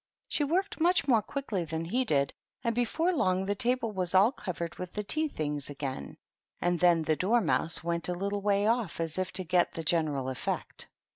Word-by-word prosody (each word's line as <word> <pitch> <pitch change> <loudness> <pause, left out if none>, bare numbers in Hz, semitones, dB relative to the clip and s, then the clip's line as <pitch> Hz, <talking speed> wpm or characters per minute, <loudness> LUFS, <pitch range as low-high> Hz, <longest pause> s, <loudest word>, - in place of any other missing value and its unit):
She 295 - 0
worked 350 +4 0
much 350 0 +3
more 235 -5 +5
quickly 220 -5 -3
than 160 0 -3
he 245 +10 +1
did, 140 - +1 0.3
and 235 -2 +1
before 310 +10 +1
long 185 - +1
the 200 - +1
table 245 0 0
was 185 -2 -1
all 200 +6 +6
covered 170 - -5
with 180 -1 -6
the 210 - -2
tea 310 +9 0
things 150 - -3
again; 135 - -5 0.4
and 175 0 +1
then 175 -2 +4
the 155 0 +2
Dormouse 185 -4 +1
went 170 +1 0
a - - +1
little 200 +2 -2
way 200 0 +2
off, 225 -6 0
as 165 +1 -1
if 185 -1 -1
to 185 - -2
get 180 0 +2
the 165 - -4
general 150 -5 +1
effect. 130 - -3
185 Hz, 200 wpm, -30 LUFS, 165-235 Hz, 0.4 s, all